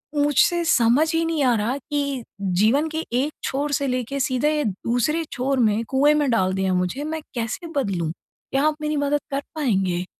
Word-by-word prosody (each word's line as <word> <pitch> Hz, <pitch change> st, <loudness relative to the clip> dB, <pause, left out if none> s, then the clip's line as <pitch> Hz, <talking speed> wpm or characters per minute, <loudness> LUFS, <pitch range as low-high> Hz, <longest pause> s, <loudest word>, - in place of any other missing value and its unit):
मुझसे 295 Hz, +4 st, +3 dB
समझ 275 Hz, +3 st, +3 dB
ही 330 Hz, 0 st, +2 dB
नहीं 320 Hz, -3 st, 0 dB
आ 250 Hz, -2 st, +4 dB
रहा 230 Hz, +6 st, -1 dB
कि 280 Hz, -4 st, -3 dB, 0.4 s
जीवन 275 Hz, +9 st, +3 dB
के 315 Hz, +1 st, -3 dB
एक 275 Hz, +5 st, +1 dB
छोर 285 Hz, +2 st, -1 dB
से 280 Hz, +1 st, 0 dB
लेके, 255 Hz, +2 st, -2 dB
सीधे 260 Hz, +3 st, +1 dB
ये 295 Hz, -, +1 dB
दूसरे 245 Hz, -, 0 dB
छोर 265 Hz, +1 st, -1 dB
में, 220 Hz, 0 st, +2 dB
कुएँ 285 Hz, +3 st, +4 dB
में 295 Hz, -3 st, +1 dB
डाल 190 Hz, -4 st, +2 dB
दिया 190 Hz, -1 st, 0 dB
मुझे। 180 Hz, +10 st, -1 dB
मैं 315 Hz, +1 st, -4 dB
कैसे 235 Hz, +9 st, -3 dB
बदलूँ? 180 Hz, -, -1 dB, 0.4 s
क्या 275 Hz, +2 st, +1 dB
आप 305 Hz, -, +1 dB
मेरी 300 Hz, 0 st, -1 dB
मदद 285 Hz, +1 st, +1 dB
कर 275 Hz, +1 st, -1 dB
पाएँगे? 190 Hz, -, 0 dB
270 Hz, 190 wpm, -23 LUFS, 230-295 Hz, 0.4 s, आ